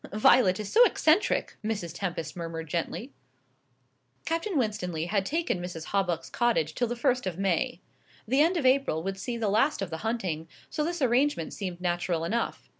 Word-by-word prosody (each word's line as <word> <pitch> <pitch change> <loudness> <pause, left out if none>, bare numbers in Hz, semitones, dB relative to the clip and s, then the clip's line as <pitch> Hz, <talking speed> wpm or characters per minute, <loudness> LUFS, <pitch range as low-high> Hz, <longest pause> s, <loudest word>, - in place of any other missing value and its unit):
"Violet 210 -2 +5
is 210 - -5
so 475 - +8
eccentric!" 330 -5 +2
Mrs. 205 -7 -3
Tempest 175 -4 -4
murmured 165 -1 -5
gently. 160 -2 -3 1.1
Captain 330 +2 -1
Winstanley 180 - -1
had 195 +1 0
taken 320 - -1
Mrs. 175 -3 -6
Hawbuck's 180 -5 0
cottage 230 -11 +1
till 245 - 0
the 240 - -3
first 245 -1 +1
of 175 -2 -3
May. 195 +6 0 0.5
The 265 +5 +3
end 340 +4 +3
of 295 - -1
April 255 - +3
would 195 +1 -3
see 235 +4 -3
the 225 -2 -1
last 225 +9 +2
of 195 -3 -4
the 160 - -3
hunting, 185 -7 -2 0.2
so 305 - -1
this 340 -1 -2
arrangement 250 - +2
seemed 185 -4 -5
natural 175 -2 -1
enough. 230 +8 -2
200 Hz, 175 wpm, -28 LUFS, 175-255 Hz, 1.1 s, so